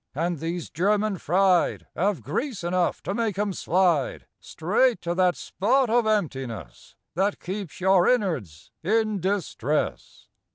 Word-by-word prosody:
And 170 Hz, +1 st, -1 dB
these 165 Hz, +1 st, -4 dB
"German 205 Hz, +3 st, +1 dB
fried" 185 Hz, +2 st, +2 dB
'Ave 190 Hz, -5 st, 0 dB
grease 195 Hz, -, -3 dB
enough 175 Hz, 0 st, 0 dB
to 195 Hz, -, -2 dB
make 215 Hz, -3 st, -1 dB
'em 205 Hz, -1 st, 0 dB
slide 175 Hz, -7 st, +1 dB
Straight 225 Hz, +9 st, +1 dB
to 170 Hz, 0 st, -1 dB
that 180 Hz, 0 st, +2 dB
spot 250 Hz, +5 st, +1 dB
of 235 Hz, -1 st, +3 dB
emptiness 135 Hz, -, -3 dB, 0.2 s
That 195 Hz, +4 st, 0 dB
keeps 190 Hz, -3 st, -6 dB
your 185 Hz, -1 st, +4 dB
innards 160 Hz, -, -1 dB
in 215 Hz, +2 st, +1 dB
distress! 175 Hz, -, -2 dB
185 Hz, 130 wpm, -25 LUFS, 165-210 Hz, 0.2 s, your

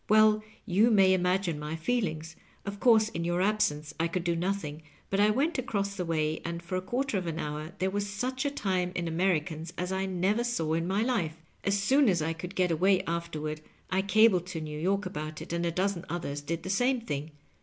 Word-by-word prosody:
"Well, 215 Hz, 0 st, +6 dB, 0.2 s
you 210 Hz, +3 st, +4 dB
may 195 Hz, -4 st, +5 dB
imagine 180 Hz, -3 st, +1 dB
my 150 Hz, +1 st, -4 dB
feelings* 160 Hz, -5 st, -2 dB, 0.3 s
Of 200 Hz, 0 st, -5 dB
course, 220 Hz, -2 st, +5 dB
in 170 Hz, -5 st, -4 dB
your 175 Hz, +1 st, 0 dB
absence 155 Hz, -7 st, +1 dB
I 165 Hz, -, +2 dB
could 170 Hz, +1 st, -2 dB
do 170 Hz, -1 st, +1 dB
nothing, 165 Hz, -4 st, -2 dB, 0.3 s
but 195 Hz, -, +1 dB
I 210 Hz, +1 st, +5 dB
went 280 Hz, +8 st, +1 dB
across 200 Hz, -6 st, -2 dB
the 180 Hz, -2 st, -2 dB
way, 155 Hz, -1 st, 0 dB
and 170 Hz, 0 st, -4 dB
for 170 Hz, +2 st, -4 dB
a 185 Hz, -, 0 dB
quarter 240 Hz, +2 st, -1 dB
of 180 Hz, -, -5 dB
an 160 Hz, -1 st, -3 dB
hour 150 Hz, +2 st, -4 dB
there 190 Hz, 0 st, 0 dB
was 205 Hz, +1 st, -2 dB
such 255 Hz, +6 st, -2 dB
a 285 Hz, -, +1 dB
time 185 Hz, -9 st, -1 dB
in 170 Hz, -1 st, -1 dB
Americans 165 Hz, -1 st, 0 dB
as 180 Hz, +1 st, -2 dB
I 190 Hz, 0 st, -1 dB
never 190 Hz, +5 st, +1 dB
saw 165 Hz, -10 st, -1 dB
in 165 Hz, +1 st, 0 dB
my 195 Hz, +4 st, +1 dB
Kfe. 220 Hz, -11 st, 0 dB, 0.3 s
As 200 Hz, 0 st, +2 dB
soon 265 Hz, +5 st, +4 dB
as 180 Hz, -3 st, +2 dB
I 160 Hz, +1 st, 0 dB
could 180 Hz, +4 st, -8 dB
get 180 Hz, -2 st, +2 dB
away 185 Hz, +4 st, +3 dB
afterward 155 Hz, -2 st, -3 dB, 0.3 s
I 190 Hz, +1 st, +2 dB
cabled 200 Hz, -2 st, +4 dB
to 180 Hz, -3 st, -4 dB
New 150 Hz, -1 st, -5 dB
York 195 Hz, +4 st, 0 dB
about 155 Hz, -4 st, -5 dB
it, -, -, -7 dB
and 170 Hz, 0 st, 0 dB
a -, -, 0 dB
dozen 185 Hz, 0 st, -1 dB
others 145 Hz, -4 st, -3 dB
did 165 Hz, +3 st, -4 dB
the 185 Hz, -, -2 dB
same 245 Hz, +4 st, +2 dB
thing. 150 Hz, -9 st, -4 dB
185 Hz, 220 wpm, -29 LUFS, 165-205 Hz, 0.3 s, Well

